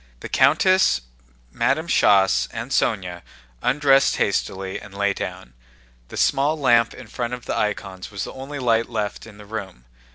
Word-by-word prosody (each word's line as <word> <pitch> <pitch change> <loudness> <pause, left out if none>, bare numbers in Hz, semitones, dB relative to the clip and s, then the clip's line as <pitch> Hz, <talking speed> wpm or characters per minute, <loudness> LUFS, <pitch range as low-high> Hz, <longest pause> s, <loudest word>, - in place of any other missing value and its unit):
The - - -7
countess, 185 - +4 0.5
Madame 145 - 0
Schoss, 100 - +4
and - - -6
Sónya 90 -5 0 0.4
undressed 135 -1 +3
hastily 95 0 -1
and 105 -1 -13
lay 100 0 +1
down. 65 -8 -7 0.5
The - - -9
small 150 +3 +2
lamp 120 -4 +3
in 130 - -10
front 120 +2 -4
of 125 - -14
the - - -2
icons 95 -3 -3
was 100 -2 -5
the - - -7
only 135 +2 -7
light 115 -3 +1
left 105 -2 -4
in 105 -2 -14
the 105 - -12
room. 95 - -7
110 Hz, 160 wpm, -22 LUFS, 100-135 Hz, 0.5 s, countess